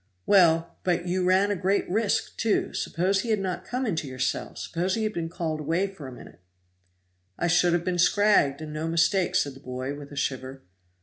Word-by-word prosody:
"Well! 170 -4 +4
but 175 -1 0
you 185 +1 0
ran 190 +3 +3
a - - +1
great 195 +2 0
risk, 210 +2 0
too. 225 -2 0
Suppose 190 +3 0
he 235 - -5
had 215 - +3
not 185 -2 -3
come 255 +1 -2
into 160 - -2
your 130 -1 -8
cell 130 0 -2
suppose 180 +2 -2
he 225 - -1
had 215 0 -1
been 165 -3 -3
called 160 -2 -3
away 165 +6 0
for 190 -8 -8
a - - -8
minute." 125 - -13 1.0
"I - - -1
should 175 0 +3
have 175 0 0
been 180 -1 -1
scragged, 185 -7 +3
and 155 -1 -6
no 155 +1 -3
mistake," 175 +3 +2
said 140 - +1
the 135 - -14
boy, 130 0 -5
with 145 0 -10
a - - -9
shiver. 130 -1 -3
175 Hz, 210 wpm, -26 LUFS, 150-195 Hz, 1.0 s, Well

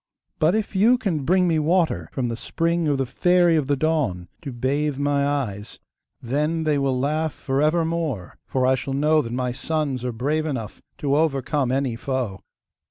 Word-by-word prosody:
But 160 +5 +3
if 220 -2 -2
you 225 +6 +5
can 175 - -2
bring 185 +3 +3
me 160 -2 +2
water 165 +2 +1
from 130 - -2
the 115 - -2
spring 165 +6 -1
of 145 -2 +2
the 135 - 0
Fairy 175 +6 +3
of 150 -4 +1
the 145 - +2
Dawn, 135 - -1
to 145 -5 -6
bathe 135 +4 -1
my 140 0 +1
eyes, 115 -8 -3 0.4
then 150 +6 -1
they 150 -2 +1
will 135 -2 0
laugh 155 +3 0
for 135 +1 -1
evermore; 160 - 0
for 130 -1 0
I 130 - +4
shall 135 +1 -2
know 155 +2 +3
that 115 -4 -6
my 125 0 -1
sons 140 -1 -2
are 125 - -1
brave 150 +7 -1
enough 120 -8 -5 0.2
to 140 -1 0
overcome 140 -3 +1
any 130 -3 0
foe. 120 -5 -3
145 Hz, 185 wpm, -23 LUFS, 130-160 Hz, 0.4 s, you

